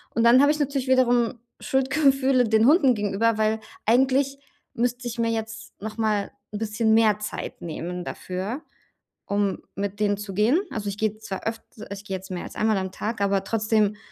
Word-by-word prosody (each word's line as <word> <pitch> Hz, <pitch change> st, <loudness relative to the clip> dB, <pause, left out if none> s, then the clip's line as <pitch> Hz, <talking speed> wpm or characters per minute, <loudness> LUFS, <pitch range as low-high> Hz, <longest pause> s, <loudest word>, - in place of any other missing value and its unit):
und 230 Hz, -, +2 dB
dann 240 Hz, +3 st, +7 dB
habe 285 Hz, -, +5 dB
ich 305 Hz, -, -1 dB
natürlich 275 Hz, -2 st, -1 dB
wiederum 245 Hz, -2 st, +3 dB, 0.2 s
Schuldgefühle 265 Hz, -1 st, +2 dB
den 220 Hz, +1 st, +3 dB
Hunden 275 Hz, -4 st, +5 dB
gegenüber, 210 Hz, +2 st, +1 dB
weil 220 Hz, 0 st, +1 dB, 0.3 s
eigentlich 265 Hz, +4 st, +2 dB, 0.3 s
müsste 245 Hz, +1 st, -1 dB
ich 235 Hz, 0 st, -5 dB
mir 230 Hz, 0 st, +2 dB
jetzt 225 Hz, 0 st, -5 dB
noch 215 Hz, +2 st, -6 dB
mal 215 Hz, -2 st, 0 dB, 0.2 s
'n -, -, -2 dB
bisschen 220 Hz, +1 st, +1 dB
mehr 215 Hz, -2 st, +4 dB
Zeit 210 Hz, -, -6 dB
nehmen 175 Hz, +2 st, -5 dB
dafür, 190 Hz, -, -5 dB, 0.6 s
um 200 Hz, -1 st, 0 dB, 0.2 s
mit 200 Hz, +1 st, -3 dB
denen 205 Hz, -1 st, +1 dB
zu 200 Hz, -2 st, -6 dB
gehen. 235 Hz, -, +3 dB
Also, 205 Hz, -2 st, -4 dB
ich 200 Hz, -, -7 dB
gehe 215 Hz, -1 st, 0 dB
zwar 210 Hz, -3 st, -6 dB
öft 225 Hz, 0 st, -3 dB, 0.3 s
ich 200 Hz, 0 st, -7 dB
gehe 190 Hz, -1 st, -3 dB
jetzt 190 Hz, +1 st, -11 dB
mehr 180 Hz, -, -4 dB
als -, -, -9 dB
einmal 215 Hz, -1 st, +2 dB
am 190 Hz, -1 st, -3 dB
Tag, 220 Hz, +1 st, -4 dB
aber 195 Hz, -1 st, +2 dB
trotzdem, 215 Hz, -1 st, +1 dB
220 Hz, 185 wpm, -25 LUFS, 205-245 Hz, 0.6 s, dann